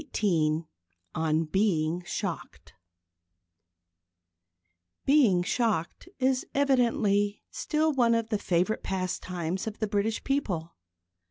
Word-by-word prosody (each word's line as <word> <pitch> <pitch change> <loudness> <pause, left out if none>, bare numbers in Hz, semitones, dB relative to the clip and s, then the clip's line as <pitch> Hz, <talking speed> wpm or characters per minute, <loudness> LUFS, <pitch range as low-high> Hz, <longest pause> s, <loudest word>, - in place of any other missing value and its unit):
XVIII 160 -5 +1 0.5
ON 160 0 +1
BEING 170 -1 0
SHOCKED - - -5 2.3
Being 245 -11 +4
shocked 215 - -1
is 260 0 +1
evidently 230 -7 +2
still 315 -10 0
one 235 -3 +3
of 230 -1 -1
the 210 -3 0
favourite 185 +3 0
pastimes 185 -1 -3
of 220 - -5
the 220 - -1
British 210 +2 -1
people. 185 - -2
205 Hz, 95 wpm, -28 LUFS, 175-240 Hz, 2.3 s, Being